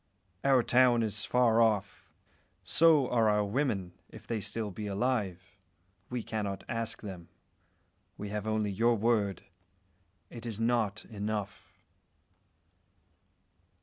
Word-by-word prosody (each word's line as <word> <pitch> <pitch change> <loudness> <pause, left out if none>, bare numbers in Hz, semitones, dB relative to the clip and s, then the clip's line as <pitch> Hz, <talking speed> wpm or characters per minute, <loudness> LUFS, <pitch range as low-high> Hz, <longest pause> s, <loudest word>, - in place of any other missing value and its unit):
Our 135 -3 +4
town 120 -1 +4
is 110 0 -1
far 120 -2 +3
off; 105 -3 0 0.5
so 155 -5 +4
are 115 -3 +3
our 105 0 +2
women, 100 -5 -1 0.2
if - - -13
they 115 - -2
be - - -4
still 105 0 -3
alive. 100 -3 -2 0.5
We 125 -2 -3
cannot 100 -3 -4
ask 115 -1 -4
them. 90 -5 -8 0.9
We 105 - -6
have 105 +1 -4
only 110 -1 0
your 115 +4 +2
word. 105 -3 0 0.9
It 120 -1 -8
is 110 -2 -5
not 115 -3 0
enough." 105 -2 -5
110 Hz, 115 wpm, -30 LUFS, 100-120 Hz, 0.9 s, Our